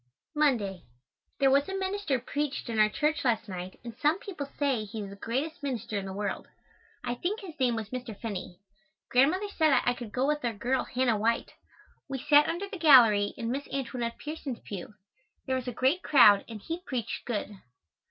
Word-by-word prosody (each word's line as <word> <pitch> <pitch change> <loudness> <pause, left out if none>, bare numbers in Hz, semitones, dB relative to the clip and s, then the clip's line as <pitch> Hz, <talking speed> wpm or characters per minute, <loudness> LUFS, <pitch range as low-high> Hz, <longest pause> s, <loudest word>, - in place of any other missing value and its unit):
Monday. 230 - +1 0.6
There 270 -1 +4
was 280 +5 +3
a 385 - -2
minister 385 -7 -1
preached 280 +1 -3
in 225 -2 -1
our 215 0 +6
church 300 +7 0
last 235 -4 +1
night 185 -1 -7
and 235 -2 -8
some 300 +6 +2
people 345 -9 -7
say 270 -6 +1
he 210 +1 -6
is 195 - -8
the - - -9
greatest 275 - -3
minister 250 -6 -3
in 195 -1 -2
the - - -5
world. 205 +1 -3 0.6
I 245 - -1
think 360 - -2
his 370 -5 -8
name 245 -3 +2
was 220 -2 -4
Mr. 250 -4 -6
Finney. 195 -5 -5 0.5
Grandmother 310 +11 +3
said 310 -9 +3
I 245 - +3
could 240 -3 -8
go 255 +4 0
with 300 0 0
our 235 -2 0
girl, 250 +5 -1
Hannah 245 -4 +1
White. 230 +2 0 0.6
We 270 - -2
sat 290 +3 +5
under 345 +5 -2
the 390 -2 -8
gallery, 230 -10 +6
in 230 0 -3
Miss 280 +2 -3
Antoinette 245 -3 -3
Pierson's 295 -5 -5
pew. 200 +1 -8 0.5
There 260 - 0
was 255 -1 -3
a - - -1
great 265 +9 +1
crowd 210 - +6
and 225 -2 -7
he 330 +1 -4
preached 255 - -4
good. 210 -3 -3
255 Hz, 195 wpm, -29 LUFS, 220-295 Hz, 0.6 s, our